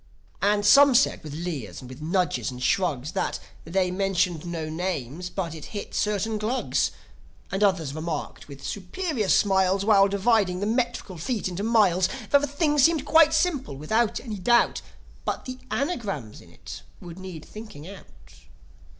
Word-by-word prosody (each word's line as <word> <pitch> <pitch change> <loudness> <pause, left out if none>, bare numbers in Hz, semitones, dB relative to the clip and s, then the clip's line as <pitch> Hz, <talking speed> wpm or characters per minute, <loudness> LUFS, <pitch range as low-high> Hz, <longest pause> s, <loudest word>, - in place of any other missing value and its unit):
And 205 0 +2
some 275 +5 +7
said 265 - +3
with 150 -2 -7
leers 150 - -5
and 130 - -10
with 130 +3 -11
nudges 165 - 0
and 125 -1 -8
shrugs 150 -7 0
That, - - -2 0.3
they 180 +2 0
mentioned 180 -3 0
no 165 -2 -4
names, 165 -1 -4
but 175 -5 -4
it 155 -2 -9
hit 205 - -7
certain 210 +1 -1
Glugs. 230 +5 0 0.6
And 195 +2 0
others 175 -8 +1
remarked, 155 0 -5
with 140 -1 -11
superior 215 - -3
smiles, 190 -1 +3
While 200 -2 +6
dividing 200 -2 +2
the 200 - -1
metrical 230 -5 -2
feet 215 +5 -2
into 185 +1 -4
miles, 205 -5 +3 0.2
That 285 - +6
the 290 - -1
thing 295 +1 +1
seemed 300 +1 +4
quite 320 +1 +6
simple, 315 - 0
without 220 +10 0
any 220 -5 -6
doubt, 235 +6 +3 0.4
But - - -3
the 255 0 -7
anagrams 205 - -3
in - - -17
it - - -10 0.2
would 175 0 -10
need 185 -5 -8
thinking 210 -8 -10
out. 195 0 -11
195 Hz, 160 wpm, -25 LUFS, 165-230 Hz, 0.6 s, some